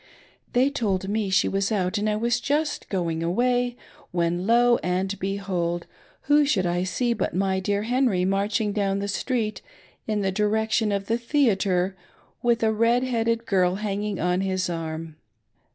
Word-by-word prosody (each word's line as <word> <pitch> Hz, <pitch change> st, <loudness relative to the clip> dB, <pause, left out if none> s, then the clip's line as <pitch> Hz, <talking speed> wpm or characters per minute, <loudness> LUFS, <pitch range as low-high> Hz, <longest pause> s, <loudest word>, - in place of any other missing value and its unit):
They 255 Hz, +3 st, +3 dB
told 195 Hz, -8 st, -1 dB
me 210 Hz, -1 st, 0 dB
she 190 Hz, -, +3 dB
was 195 Hz, +2 st, 0 dB
out 195 Hz, 0 st, 0 dB
and 215 Hz, +1 st, 0 dB
I 210 Hz, -, +1 dB
was 235 Hz, +2 st, +1 dB
just 295 Hz, +3 st, -1 dB
going 170 Hz, -4 st, -1 dB
away 245 Hz, +7 st, +1 dB, 0.3 s
when» 175 Hz, +1 st, -1 dB
lo 240 Hz, +1 st, +4 dB
and 185 Hz, +2 st, -1 dB
behold, 185 Hz, -3 st, -2 dB, 0.4 s
who 295 Hz, +1 st, +4 dB
should 210 Hz, -10 st, +1 dB
I 175 Hz, 0 st, 0 dB
see 235 Hz, +6 st, 0 dB
but 215 Hz, -, -2 dB
my 190 Hz, 0 st, +1 dB
dear 200 Hz, +2 st, -1 dB
Henry 235 Hz, -6 st, +1 dB
ma, 195 Hz, +1 st, +1 dB
rching 210 Hz, 0 st, -1 dB
down 195 Hz, -1 st, 0 dB
the 200 Hz, 0 st, -2 dB
street 215 Hz, +1 st, -2 dB, 0.5 s
in 215 Hz, -1 st, 0 dB
the 195 Hz, -1 st, 0 dB
direction 215 Hz, +2 st, +1 dB
of 200 Hz, -1 st, -1 dB
the 230 Hz, +3 st, 0 dB
theatre 195 Hz, -8 st, +1 dB, 0.5 s
with 235 Hz, -1 st, +2 dB
a 220 Hz, 0 st, +3 dB
red 230 Hz, +3 st, +2 dB
headed 230 Hz, -2 st, 0 dB
girl 185 Hz, -3 st, +2 dB
hanging 205 Hz, -1 st, -3 dB
on 180 Hz, +2 st, +1 dB
his 185 Hz, -2 st, -1 dB
arm. 160 Hz, -1 st, -5 dB
205 Hz, 170 wpm, -25 LUFS, 185-230 Hz, 0.5 s, lo